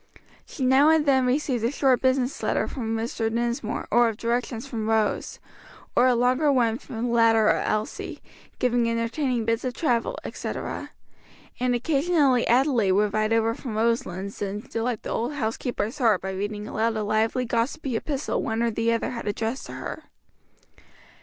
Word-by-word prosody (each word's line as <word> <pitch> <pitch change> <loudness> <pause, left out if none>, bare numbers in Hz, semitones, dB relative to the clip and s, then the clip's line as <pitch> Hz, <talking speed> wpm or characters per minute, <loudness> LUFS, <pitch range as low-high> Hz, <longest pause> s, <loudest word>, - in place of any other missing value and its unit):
She 260 - -3
now 270 +4 +5
and 320 -1 +4
then 265 -3 +3
received 255 -3 0
a 230 - +2
short 265 -2 +2
business 260 0 +1
letter - - 0
from 225 -4 -3
Mr. 225 0 -2
Dinsmore 235 -1 -2
or 240 +1 +5
of 220 - -6
directions 235 +1 -2
from 225 -5 -4
Rose; 220 -1 0 0.6
or 250 - +5
a 250 - +4
longer 255 +5 +3
one 235 -3 +2
from 225 -1 -6
the 240 - -1
latter 225 -2 +4
or - - +3
Elsie, 215 0 -3 0.4
giving 240 -1 +1
entertaining 230 +1 -1
bits 230 +1 0
of 255 -1 -3
travel, 245 -8 0
etc.; - - -5 0.7
and 250 0 +1
occasionally 280 -1 +2
Adelaide 240 -6 +3
would 205 +1 +2
ride 215 0 +1
over 225 0 +2
from 230 -3 -6
Roselands 205 -4 -1
and 205 +1 -4
delight 230 0 -2
the - - -5
old 240 +6 -1
housekeeper's 240 0 -3
heart 225 -7 +4
by 190 - -4
reading 205 +2 -4
aloud 225 +1 0
a 215 - -1
lively 220 +4 +1
gossipy 245 +3 -1
epistle 280 +4 -2
one 225 +1 -1
or 235 - +1
the 225 +1 0
other 230 - -1
had 235 -3 -6
addressed 225 +5 -3
to - - -8
her. - - -7
235 Hz, 170 wpm, -25 LUFS, 225-255 Hz, 0.7 s, now